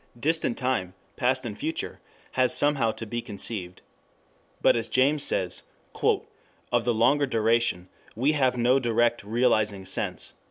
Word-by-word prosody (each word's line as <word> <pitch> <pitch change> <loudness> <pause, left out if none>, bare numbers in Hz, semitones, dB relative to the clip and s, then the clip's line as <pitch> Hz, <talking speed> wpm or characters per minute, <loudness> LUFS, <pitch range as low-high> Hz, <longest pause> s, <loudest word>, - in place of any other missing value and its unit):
Distant 160 -3 +1
time, 110 -9 -1 0.2
past 130 +1 0
and 110 -3 -5
future, 160 +8 -4 0.3
has 130 -1 +2
somehow 145 -6 +2
to 115 - -7
be 120 +2 -4
conceived. 100 -4 -5 0.8
But - - +4
as 115 -1 -2
James 140 +3 +3
says, 90 -9 0 0.3
"of 120 -1 -2
the 120 - +2
longer 140 +6 +3
duration 115 -6 +1 0.3
we 130 +7 +2
have 130 -4 +1
no 125 +3 +3
direct 120 -2 +1
'realizing' 110 -3 +1
sense." 95 - -1
120 Hz, 135 wpm, -26 LUFS, 110-130 Hz, 0.8 s, But